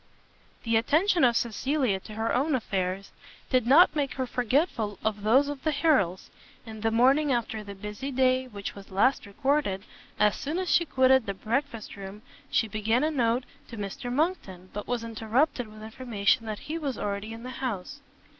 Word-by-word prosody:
The 230 -1 +2
attention 325 - +3
of 240 -2 +5
Cecilia 245 -2 0
to 215 - -11
her 225 +1 -1
own 280 +3 +2
affairs, 195 -4 -2 0.4
did 255 -3 +2
not 310 +5 +7
make 285 -3 -1
her 260 - -1
forgetful 245 - 0
of 215 -1 0
those 250 +7 +4
of 290 -2 -5
the 315 - +1
Harrels: 275 - +1 0.3
and 220 -2 -9
the 225 - +2
morning 265 +6 +4
after 235 -3 -1
the 200 -1 -9
busy 210 +7 -6
day 260 -1 +2
which 200 -4 -6
was 200 -1 -12
last 210 +5 +2
recorded, 265 -3 0 0.3
as 210 -1 +3
soon 300 +5 -3
as 370 -1 -1
she 340 - +4
quitted 260 -4 +3
the 200 - -2
breakfast 230 +1 -3
room, 200 +2 -9 0.3
she 225 - +2
began 220 +4 0
a 310 - +1
note 245 -3 +1 0.2
to 230 - -9
Mr 225 +5 -5
Monckton, 245 - -2
but 205 - -5
was 245 -2 -2
interrupted 230 +4 0
with 215 0 -12
information 225 -1 0
that 215 -1 -5
he 320 +2 -3
was 280 -5 -3
already 205 +1 -3
in 225 +1 -8
the 255 - -6
house. 255 +4 -4
235 Hz, 185 wpm, -27 LUFS, 210-275 Hz, 0.4 s, not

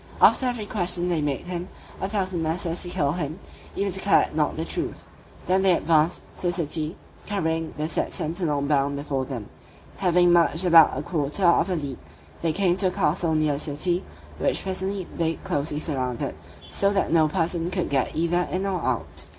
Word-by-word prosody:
After 260 - +6
every 240 -4 -2
question 180 -3 +1
they 170 -3 +1
made 145 -2 -1
him 180 0 -5 0.3
a 190 - -2
thousand 190 -4 -1
menaces 165 +1 -1
to 175 - -1
kill 145 -5 +1
him, 155 -1 -3 0.4
if 200 - 0
he 200 - -1
declared 195 -5 +3
not 150 -1 0
the 160 - -2
truth. 345 - -4 0.4
Then 185 +1 +2
they 190 -1 +4
advanced 160 0 +2
to 180 - -1
the - - +2
city, 160 -2 -1 0.3
carrying 165 -5 -2
the 155 +1 -1
said - - -1
sentinel 160 -4 -1
bound 140 -1 +1
before 140 -2 -2
them: 125 -6 -6 0.5
having 175 -1 +4
marched 170 +1 +3
about 165 -6 +7
a 145 - -3
quarter 150 +3 -1
of 175 +3 +4
a 185 - 0
league, 140 -5 -5 0.4
they 165 - +1
came 180 +1 +2
to 190 -1 +2
the - - -7
castle 165 -3 +1
near 155 -1 +2
the 140 - -3
city, 175 +5 -1 0.4
which - - +1
presently 190 0 -2
they 165 -1 0
closely 150 -5 -2
surrounded, 130 -6 -2 0.3
so 200 0 +1
that 195 -1 0
no 160 -2 +5
person 170 +1 -1
could 180 -4 -1
get 135 -2 0
either 175 +2 +1
in 190 +2 -1
or 190 -3 -1
out. 125 -4 -2
170 Hz, 190 wpm, -25 LUFS, 150-185 Hz, 0.5 s, about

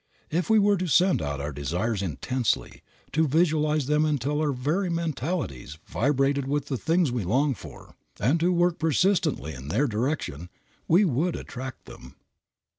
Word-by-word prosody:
If 170 +6 -1
we 220 - +5
were 205 -1 +4
to 185 0 -2
send 180 - +3
out 70 -2 -3
our 70 +2 -3
desires 90 - -2
intensely; 115 - -2 0.3
to 160 +1 +2
visualize 155 -1 +2
them 150 +2 +2
until 150 0 0
our 150 -2 +1
very 150 +9 -1
mentalities 155 - -3
vibrated 135 +1 +1
with 145 0 -1
the 135 - -1
things 165 -3 +2
we 120 -4 -2
long 135 +10 +2
for, - - -12 0.3
and 135 - +2
to 175 +3 +2
work 175 -1 +2
persistently 160 - +1
in 65 +1 -9
their 110 - +1
direction, 110 - -2 0.4
we 185 +6 +5
would 165 +3 0
attract 130 +1 -7
them. 65 +2 -13
145 Hz, 160 wpm, -26 LUFS, 115-165 Hz, 0.4 s, we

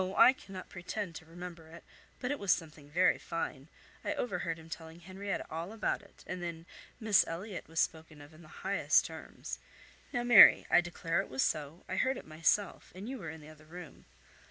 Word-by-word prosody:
I 260 - +9
cannot 190 -7 -10
pretend 180 +1 -5
to 160 - -13
remember 170 -1 -9
it, 165 +1 -12 0.4
but 250 +1 -2
it 290 - -2
was 200 -2 +2
something 155 -4 -2
very 180 +5 +3
fine—I 155 -3 -5
overheard 175 -7 -2
him 160 0 -13
telling 165 +1 -8
Henrietta 190 +3 -4
all 165 +4 -4
about 220 -1 -1
it; 200 - -19
and 180 0 -5
then 170 -1 -5 0.3
'Miss 215 -3 +5
Elliot' 185 +4 -5
was 165 +1 -3
spoken 160 -2 -1
of 145 +2 -13
in 155 - -15
the 160 - -14 0.2
highest 200 +1 +3
terms! - - -7 0.5
Now 240 - -1
Mary, 240 -3 +9
I - - +7
declare 170 -1 -1
it - - -9
was 130 0 +1
so, 155 +3 -2
I 185 - -3
heard 260 +4 +2
it - - -9
myself, 165 +6 0
and 195 +4 -7
you 260 0 -5
were 165 -5 -6
in 160 0 -8
the 150 - -12
other 155 0 -15
room. 175 -2 -11
170 Hz, 200 wpm, -32 LUFS, 160-195 Hz, 0.5 s, I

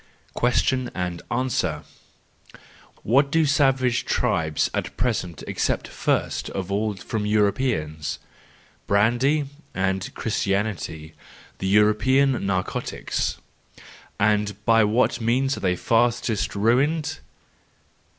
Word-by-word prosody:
Question 125 +1 +1
and 90 -2 -3
Answer 120 -10 -1 1.2
.—What 140 +5 +3
do 160 0 +3
savage 135 -4 +2
tribes 80 -2 0
at - - -4
present 105 - -2
accept - - -1
first - - -1
of 95 0 -5
all 105 +1 0
from 105 +2 -4
Europeans? 100 - 0 0.7
Brandy 120 +9 +2 0.3
and 95 0 -1
Christianity, 100 -7 -2 0.5
the 95 - -2
European 120 +6 +3
narcotics.— 95 -2 -2 0.8
And 105 0 +2
by 115 -1 +5
what 115 +4 +1
means 130 +4 +1
are - - -5
they 90 -2 +1
fastest 115 +1 +1
ruined 135 +9 +1
110 Hz, 95 wpm, -24 LUFS, 95-130 Hz, 1.2 s, by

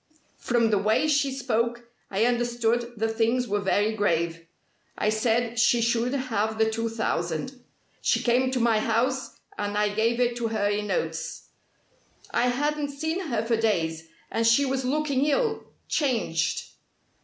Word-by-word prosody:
From 235 -2 +1
the 205 - +3
way 215 +9 +2
she 280 -2 +2
spoke, 240 -2 -1 0.3
I 200 +3 +1
understood 240 -1 0
that 225 +1 0
things 230 +3 +1
were 205 +1 0
very 205 +2 +1
grave. 165 -5 -1 0.5
I 210 - +1
said 230 +2 0
she 240 +1 +4
should 235 +2 +1
have 220 -5 -1
the 220 0 +3
two 230 +1 -2
thousand. 225 - -3 0.4
She - - +1
came 250 +2 +3
to 260 -1 -1
my 230 -2 +3
house 245 +4 -1 0.2
and 205 0 -2
I 210 0 +2
gave 230 +3 +1
it 240 -1 +2
to 235 -1 -1
her 215 -2 0
in 205 0 -1
notes. 485 - -3 0.8
I 245 - +2
hadn't 290 +3 0
seen 320 +6 -3
her 230 -5 -1
for 230 0 +1
days, 165 -7 0 0.2
and 230 0 +1
she 230 +5 +5
was 265 0 -1
looking 280 0 +1
ill 445 +8 0 0.2
changed. 225 - 0
230 Hz, 155 wpm, -26 LUFS, 215-255 Hz, 0.8 s, she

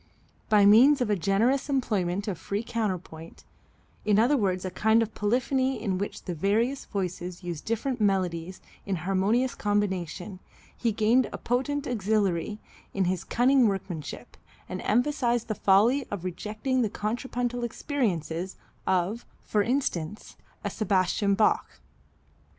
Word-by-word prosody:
By 210 -2 +6
means 250 +8 +7
of 240 -4 0
a - - +3
generous 220 - +1
employment 205 -8 0
of 185 -5 -3
free 200 +5 -3
counterpoint, 185 -8 -4 0.6
in 210 -1 +3
other 240 +7 +4
words 190 -6 0
a 185 - -3
kind 220 +3 +3
of 220 0 -7
polyphony 255 +4 0
in 195 -4 -1
which 200 - -4
the 180 - -4
various 220 - 0
voices 180 -2 -4
use 175 -3 -4
different 230 +2 -2
melodies 185 -3 0 0.2
in 195 - -2
harmonious 195 +8 +1
combination, 190 -2 -2 0.4
he 235 - 0
gained 225 +4 +3
a - - -5
potent 275 +4 -1
auxiliary 210 -4 0 0.4
in 195 -1 +2
his 180 -1 -1
cunning 255 0 +3
workmanship, 185 -6 -5 0.3
and 185 - -5
emphasized 240 0 +1
the 215 - -1
folly 220 +8 +3
of 200 -4 -5
rejecting 215 +8 -2
the 220 - +1
contrapuntal 245 +3 -3
experiences, 190 - -2 0.3
of, 190 +5 0 0.2
for 210 - +1
instance, 210 - -2 0.3
a - - -2
Sebastian 200 -1 +1
Bach. 210 - +2
210 Hz, 135 wpm, -27 LUFS, 185-240 Hz, 0.6 s, means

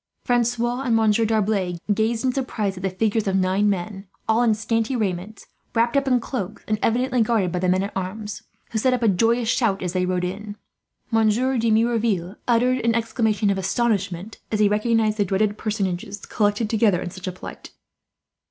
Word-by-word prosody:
Francois 240 0 +1
and 245 -4 +1
Monsieur 220 0 +3
D'Arblay 205 -5 0 0.2
gazed 225 +3 0
in 255 - +3
surprise 220 -7 -2
at 185 - -8
the 190 - 0
figures 210 +3 0
of 190 - +1
nine 190 +2 +2
men, 195 +1 -3 0.2
all 220 +2 +3
in 230 -3 +3
scanty 225 +3 -1
raiments, 200 -1 -3 0.3
wrapped 235 +3 +2
up 280 0 +2
in 250 -2 +3
cloaks, 215 -5 -5
and 215 -1 0
evidently 250 +1 +1
guarded 215 -5 +1
by 180 - -1
the 185 0 +1
men 185 +1 +2
at 200 - -6
arms, 205 +3 -4 0.3
who 220 - 0
set 255 +3 +3
up 245 - -3
a - - +4
joyous 225 +4 +2
shout 215 -5 +1
as 180 -1 -2
they 185 -1 +1
rode 180 -1 0
in. 205 +3 -5 0.6
Monsieur 225 +4 +2
de 230 0 +1
Merouville 220 -5 +1
uttered 250 +2 +3
an 230 -1 +1
exclamation 220 -2 +1
of 195 - -1
astonishment, 200 -2 -1
as 215 - 0
he 210 - +5
recognized 215 +1 +1
the 205 - +3
dreaded 205 +2 +1
personages 200 -2 -3
collected 205 +1 0
together 210 -4 +2
in 180 - -5
such 185 +1 -8
a - - -1
plight. 180 - -10
215 Hz, 190 wpm, -23 LUFS, 195-230 Hz, 0.6 s, he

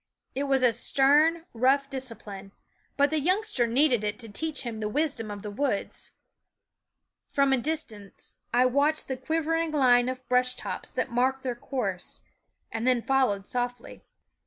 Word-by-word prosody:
It 280 +2 -2
was 255 -5 +3
stern, 305 +5 +4
rough 265 +4 +2
discipline; 220 -7 -6 0.4
but 285 +1 +3
the 315 - +1
youngster 360 - +1
needed 245 -1 +3
it 210 0 -2
to 225 - -6
teach 310 +8 -2
him 230 -3 -5
the 210 -1 -2
wis 300 +5 0
dom 225 -4 -6
of 205 -1 -7
the 210 - -5
woods. 230 -2 -2 1.2
From 275 -1 +2
a 265 - +3
distance 230 -9 -6
I 245 +1 +4
THE 255 - +3
WOODS 250 - -8
watched 305 +2 +2
the 260 - -2
quivering 325 +4 -1
line 250 -4 +4
of 255 0 -6
brush 250 0 +2
tops - - -6
that - - -3
marked 260 +2 +1
their 255 -2 -1
course, 235 -7 -4 0.5
and 225 +2 -2
then 250 -2 +3
followed 255 -8 +1
softly. 245 0 -4
255 Hz, 165 wpm, -27 LUFS, 230-285 Hz, 1.2 s, stern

